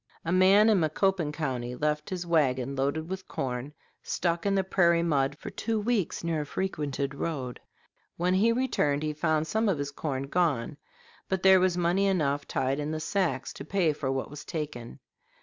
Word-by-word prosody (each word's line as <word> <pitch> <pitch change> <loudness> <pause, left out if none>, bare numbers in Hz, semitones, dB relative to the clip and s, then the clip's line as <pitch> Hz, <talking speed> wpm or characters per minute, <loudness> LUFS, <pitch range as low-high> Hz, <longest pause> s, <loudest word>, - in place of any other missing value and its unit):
A 165 - -1
man 190 +4 +6
in 215 -4 +4
Macoupin 170 0 +1
County 125 -5 -3
left 150 +3 -1
his 180 -2 -4
wagon, 140 -5 +1
loaded 140 +4 -1
with 190 +1 -6
corn, 130 +1 -4 0.3
stuck 170 +1 -1
in 200 - +2
the 195 - +2
prairie 170 -3 +3
mud 145 -3 +1
for - - -8
two 225 -1 -2
weeks 210 -6 -1
near 165 -2 0
a - - -4
frequented 145 -6 -2
road. 140 -4 -4 0.6
When 180 +2 +1
he 210 +5 +4
returned 230 - +1
he 155 0 -1
found 155 0 +1
some 220 +6 +1
of 185 - +1
his 140 0 -3
corn 140 -2 -3
gone, 145 -4 0 0.5
but 190 -1 -1
there 190 0 +7
was 180 -1 +2
money 180 +3 +2
enough 145 -7 0
tied 135 +2 -1
in 150 0 -2
the 155 0 -2
sacks 155 -7 -1
to - - -8
pay 170 0 +1
for 135 -2 -2
what 135 +1 -3
was 145 0 -8
taken. 150 -7 -5
155 Hz, 185 wpm, -28 LUFS, 140-185 Hz, 0.6 s, there